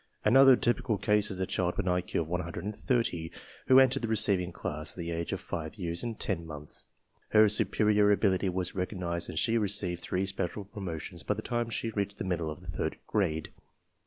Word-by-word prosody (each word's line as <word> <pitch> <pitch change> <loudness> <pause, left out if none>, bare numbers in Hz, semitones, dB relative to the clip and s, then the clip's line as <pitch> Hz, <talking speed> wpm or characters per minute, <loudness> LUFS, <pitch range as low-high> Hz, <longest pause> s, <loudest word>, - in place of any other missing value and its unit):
Another 135 +4 +8
typical 120 -3 0
case 105 +1 +2
is 95 - -3
a 95 - +1
child 90 -1 -1
with - - -1
an 90 - +2
IQ 90 -1 -1
of 80 - -4
130 90 - -2 0.4
who 130 0 +8
entered 135 +1 +4
the 115 - -2
receiving 100 -5 +3
class 75 -2 -3
at - - -20
the 85 -1 -4
age 85 0 -3
of - - -2
5 80 +2 -5
years 85 -4 -3
and 115 -2 -5
10 90 -5 -2
months. 75 -2 -7 0.4
Her 110 0 +6
superior 105 0 +3
ability 100 -2 +2
was 90 0 -2
recognized 90 -2 -3
and - - -6
she 115 +7 +2
received 100 -4 0
three 95 +1 -1
special 95 +1 -3
promotions 90 -4 -6
by 105 - -1
the 110 - -6
time 120 -1 -1
she 115 0 -2
reached 100 -1 -3
the - - -4
middle 85 -4 -1
of 75 - -7
the - - -14
third - - -3
grade. 80 -7 -1
95 Hz, 200 wpm, -30 LUFS, 85-105 Hz, 0.4 s, Another